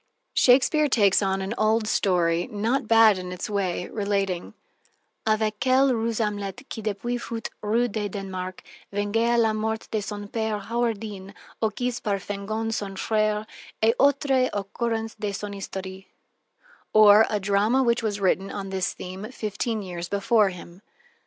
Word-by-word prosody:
Shakespeare 270 +4 +4
takes 205 -6 +4
an 195 +1 -1
old 215 0 +2
story, 175 -5 +1
not 225 +4 -1
bad 225 -3 +6
in 180 0 -6
its 180 +3 -5
way, 185 -3 -1
relating: 195 -4 -2 0.7
"Avec 215 -1 +1
quelle 260 +1 +4
ruse 230 -1 -1
Amlette 210 +3 -3
qui 225 - -5
depuis 220 +4 -2
fut 230 -2 -5
Roy 230 +3 +1
de 210 -2 -3
Dannemarch, 185 -2 -6 0.3
vengea 225 +4 +1
la 225 -2 +3
mort 220 +1 -2
de 215 - 0
son 205 0 -6
père 220 -1 -2
Horwendille, 210 -3 -3 0.3
occis 240 +2 -1
par 205 -2 0
Fengon 205 +3 -4
son 200 -3 -4
frère, 215 +1 0 0.4
et 225 +1 +5
autre 275 -2 +3
occurrence 225 +2 -2
de 205 -1 -2
son 205 +1 -5
histoire," 190 -1 -7 0.9
or 215 0 +8
a 210 - 0
drama 205 +6 +2
which 235 -1 +2
was 210 -2 -2
written 195 0 +1
on 195 -1 -5
this 190 -1 -1
theme 190 +5 -7
fifteen 215 -1 -3
years 175 -2 -6
before 200 +1 +3
him. 180 0 -11
210 Hz, 145 wpm, -25 LUFS, 195-225 Hz, 0.9 s, or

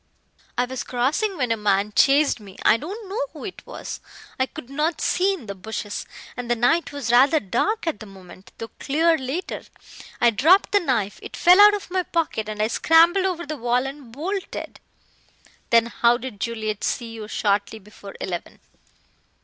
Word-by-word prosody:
I 245 - +2
was 260 0 -5
crossing 300 - -1
when 250 -4 0
a - - +3
man 210 -1 0
chased 280 -2 +4
me. 200 -3 -13
I 215 - +6
don't 390 - -6
know 410 +6 -3
who - - -9
it 385 - -8
was. - - -7 0.4
I 260 - +2
could 310 -3 -10
not 300 +5 -1
see 385 +2 +1
in 300 -11 -12
the 200 - -5
bushes, 205 +1 -6 0.3
and 245 -1 -6
the 240 - +3
night 245 +9 +2
was 280 -5 -3
rather 270 +6 +5
dark 420 - -1
at 325 - -2
the 215 - -10
moment, 190 -1 -14
though 225 - -7
clear 325 +4 +2
later. 285 +6 -4 0.6
I 235 - +5
dropped 325 - +4
the 410 - +4
knife, 235 - -1
it - - -9
fell 360 +3 +7
out 415 0 +8
of 400 -3 -8
my 370 0 +1
pocket, 320 -12 -2
and 210 0 -2
I - - +2
scrambled 330 - +4
over 355 -3 -2
the 305 +1 -5
wall 245 +1 0
and 270 -3 -8
bolted." 365 - -5 0.9
"Then 230 -1 +5
how 235 0 +2
did 245 -4 -8
Juliet 220 -2 -3
see 235 -2 -2
you 220 -2 -7
shortly 205 0 0
before 205 -1 -13
eleven?" 175 -2 -5
255 Hz, 185 wpm, -23 LUFS, 220-330 Hz, 0.9 s, out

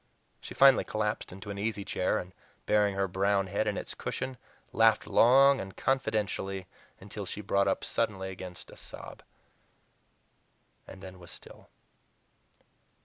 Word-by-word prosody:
She - - -10
finally 135 -1 +6
collapsed 110 0 -3
into 95 +3 -8
an 100 - -6
easy 105 -1 -2
chair, 90 - 0
and, 90 +1 -6 0.3
burying 105 -2 +2
her 100 0 0
brown 100 +1 +1
head 100 +3 -1
in 105 - -1
its - - -6
cushions, 130 -1 -5 0.4
laughed - - +4
long 135 +3 +5
and 95 0 -9
confidentially 105 -7 -1 0.3
until 100 0 -7
she - - -6
brought 100 -1 +1
up 95 - 0
suddenly 100 -4 -2
against 90 -1 -9
a - - -13
sob. - - -10 1.7
And 95 0 -12
then 95 -1 -10
was 85 - -13
still. - - -14
100 Hz, 145 wpm, -29 LUFS, 95-110 Hz, 1.7 s, finally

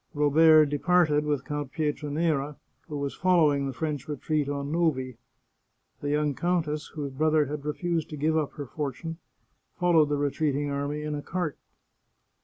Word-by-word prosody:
Robert 155 +2 +6
departed 150 0 +2
with 145 -3 -1
Count 145 -3 -4
Pietranera, 150 -1 -1 0.3
who 150 - -5
was 140 -1 -3
following 155 -6 +3
the - - -2
French 150 +2 -4
retreat 150 0 -1
on 140 0 -3
Novi. 130 -8 0 0.8
The 145 - -2
young 150 0 +1
countess, 160 -2 -1
whose 145 -3 -4
brother 155 +2 +2
had 145 +1 -5
refused 165 +1 -2
to 150 - -6
give 155 +2 +1
up 155 -3 0
her 145 - -6
for 145 +2 -3
tune, 165 +5 -7 0.6
followed 165 -4 +4
the 145 - +1
retreating 145 0 0
army 145 +2 -2
in 150 0 -3
a 145 - -3
cart. 175 -2 -3
150 Hz, 160 wpm, -27 LUFS, 145-160 Hz, 0.8 s, Robert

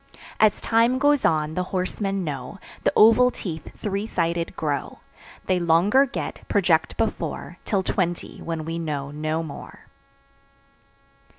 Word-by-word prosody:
As 215 -1 +4
time 230 +3 +3
goes 290 0 +3
on, 155 -1 +1
the 180 - -1
horsemen 195 +1 -2
know, 140 +3 -5 0.3
The - - +3
oval 230 +3 +7
teeth 160 -10 -6
three 205 +1 -3
sided 170 -4 -1
grow; 145 -3 -3 0.5
They 185 -1 +1
longer 180 +11 +4
get, 270 - -5
project - - +2
before, - - -3
Till 195 -3 0
twenty, 175 -2 -2
when 165 -2 -4
we 165 +1 -3
know 145 -4 -3
no 155 +2 -2
more. 155 -3 -9
175 Hz, 130 wpm, -24 LUFS, 160-210 Hz, 0.5 s, oval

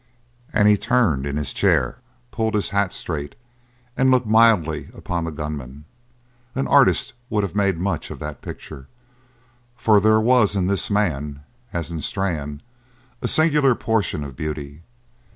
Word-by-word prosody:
And 105 0 +3
he 105 0 +5
turned 100 - +1
in 70 0 -3
his 75 -3 -3
chair, 125 - +1 0.3
pulled 110 -1 -1
his 100 -5 0
hat 100 -2 0
straight, 75 -4 -5 0.6
and 130 0 +3
looked 130 -1 +3
mildly 110 -8 +3
upon 85 -2 -3
the 80 - -4
gunman. 75 -2 -6 0.7
An 135 - 0
artist 135 -1 +4 0.2
would 105 -2 0
have 100 - -3
made 100 -3 +1
much 95 +4 -2
of - - -7
that 75 -3 -7
picture, 65 0 -9 0.9
for 110 -3 +4
there 110 +2 +4
was 115 -2 +3
in 95 -2 +1
this 100 0 0
man, 75 -9 -1 0.3
as 85 -1 -4
in 80 -2 -4
Strann, 75 -5 -3 0.6
a - - -1
singular 150 -5 +4
portion 110 -11 -1
of 70 -3 -8
beauty. 75 +1 -6
95 Hz, 150 wpm, -22 LUFS, 75-110 Hz, 0.9 s, he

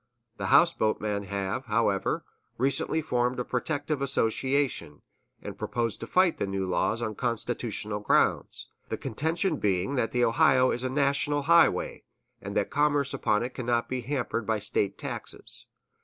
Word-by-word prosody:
The - - -3
houseboat 165 -11 +4
men 105 -1 -2
have, 100 +6 -3
however, 105 -3 0 0.3
recently 135 +5 +1
formed 125 -3 0
a 125 - -2
protective 145 +3 -2
association, 130 - 0 0.4
and - - -6
propose 115 -2 -1
to 115 - -7
fight 185 +2 +3
the 100 - -1
new 95 -1 -2
laws 110 +5 0
on 110 - -2
constitutional 115 -2 -2
grounds, 105 - +1 0.2
the - - -2
contention 160 - -1
being 95 +4 0
that 125 -4 0
the 120 -1 +2
Ohio 130 +1 +4
is 120 - 0
a 130 - -1
national 140 +1 +1
highway, 170 - +3 0.4
and - - -4
that - - 0
commerce 145 -2 +1
upon 105 +1 +1
it 125 - -5
cannot 120 -2 -1
be 130 -1 -3
hampered 120 -3 -2
by 110 -1 +1
State 100 -1 0
taxes. - - -5
125 Hz, 155 wpm, -28 LUFS, 110-140 Hz, 0.4 s, houseboat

